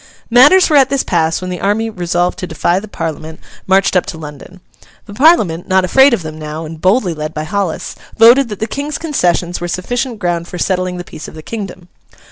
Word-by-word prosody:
Matters 290 +10 +6
were 300 - +3
at 270 -2 +4
this 275 -1 0
pass 165 -1 0
when 185 0 -5
the 180 - -5
army, 210 +3 0
resolved 175 -3 -2
to 180 - -4
defy 170 +3 0
the 215 - -10
Parliament, 160 -4 -6 0.3
marched 190 0 +2
up 180 - +2
to 160 - -6
London. 155 +4 -11 0.5
The 205 - -11
Parliament, 210 - +3
not 190 0 +2
afraid 265 +9 +5
of 230 -8 -1
them 155 0 -8
now, 155 +1 -6
and 160 0 -9
boldly 185 -1 +2
led 155 0 -6
by 155 - -3
Hollis, 185 +1 -3 0.2
voted 235 +3 +6
that 210 - -6
the 220 - -1
King's 285 +6 -4
concessions 175 - -1
were 175 - -3
sufficient 240 +7 -3
ground 175 -3 -2
for 180 - -7
settling 185 0 -1
the 175 - -6
peace 155 - -10
of - - -12
the 155 - -10
kingdom. 190 -5 -7
185 Hz, 215 wpm, -15 LUFS, 165-225 Hz, 0.5 s, Matters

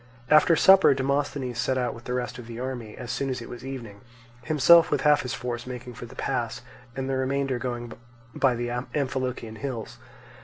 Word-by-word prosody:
After 155 +2 +6
supper 190 -3 +7
Demosthenes 135 -2 -1
set 130 +1 +1
out 125 -2 -1
with 120 - -12
the 125 - -2
rest 125 0 -3
of 120 - -10
the 115 0 -7
army, 125 -4 -5
as 125 -1 -6
soon 135 +2 -2
as 130 - -2
it 115 - -8
was 120 - -9
evening; 120 -7 -7 0.4
himself 160 +4 +6
with - - 0
half 150 -1 +4
his 125 - -4
force 120 0 -5
making 125 -1 -7
for 120 0 -9
the - - -14
pass, - - -2 0.3
and 135 0 -3
the 135 - -1
remainder 135 -1 -1
going 120 -2 -4 0.4
by 130 -1 +2
the 120 0 -3 0.3
Amphilochian 130 -5 -2
hills. 120 -1 -6
125 Hz, 195 wpm, -26 LUFS, 120-135 Hz, 0.4 s, supper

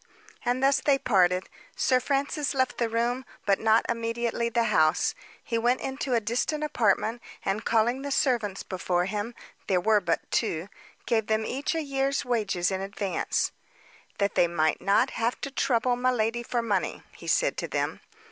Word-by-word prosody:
And 250 +2 0
thus 275 0 +4
they 280 -2 +3
parted. 185 -7 +2 0.3
Sir 255 -1 +3
Francis 280 +1 -1
left 260 -1 0
the 235 -1 +1
room, 240 +3 0 0.2
but 195 -1 +3
not 220 +1 +3
immediately 235 0 -1
the 235 0 +1
house. 155 0 +3 0.3
He 230 -1 -1
went 240 +2 +2
into 265 -1 -2
a - - +4
distant 245 +8 -1
apartment, 230 -4 +1 0.2
and, 195 +2 -1
calling 235 +3 +2
the 285 - -4
servants 240 -8 0
before 180 -1 -1
him 210 +4 -3 0.3
there 185 -2 +3
were 210 +2 +3
but 170 -3 -2
two 165 +5 -1 0.4
gave 220 -3 +1
them 220 0 +1
each 280 +8 -2
a 325 - -1
year's 275 -1 -1
wages 200 -7 0
in 190 0 -2
advance 195 0 -1 0.7
"That 200 0 +1
they 175 - +4
might 155 -2 +1
not 195 +1 +3
have 230 +2 -1
to 280 - -4
trouble 245 -2 +1
miladi 240 -2 +1
for 240 0 -1
money," 205 -5 -1
he - - -11
said - - +2
to - - -2
them. - - -2
230 Hz, 170 wpm, -27 LUFS, 200-255 Hz, 0.7 s, thus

